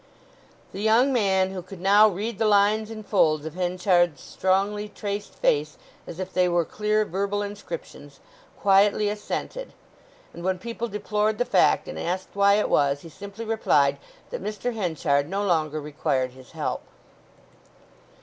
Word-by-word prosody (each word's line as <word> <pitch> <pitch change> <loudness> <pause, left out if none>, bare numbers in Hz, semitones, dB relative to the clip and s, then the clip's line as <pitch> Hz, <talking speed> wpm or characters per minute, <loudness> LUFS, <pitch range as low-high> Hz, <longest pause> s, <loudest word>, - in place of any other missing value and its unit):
The 195 - -6
young 230 +5 +4
man, 190 -5 +2
who 190 -1 -5
could 185 +1 -11
now 200 +4 +6
read 210 +2 -3
the 220 - +2
lines 210 +1 +3
and 215 -1 -8
folds 155 -7 +2
of 160 - -5
Henchard's 180 -2 +1
strongly 200 +3 -1
traced 205 0 -5
face 150 +1 0 0.3
as 165 - -8
if 185 0 -5
they 180 -1 +3
were 175 -1 +1
clear 215 +3 0
verbal 200 +2 -2
inscriptions, 205 - -8 0.4
quietly 200 +1 +4
assented; 215 - -5 0.6
and 170 - -9
when 185 0 0
people 235 +4 -5
deplored 210 0 -1
the 245 - +1
fact, - - +3
and - - -6
asked 185 +2 -3
why 200 0 +4
it 210 - +1
was, 140 -1 +2
he 165 - -11
simply 200 +6 -9
replied 150 -11 +2 0.3
that - - -5
Mr. 215 +3 -3
Henchard 160 -8 0
no 200 +2 -1
longer 155 -4 0
required 140 -3 -1
his 130 -1 -16
help. - - -3
200 Hz, 155 wpm, -25 LUFS, 175-210 Hz, 0.6 s, now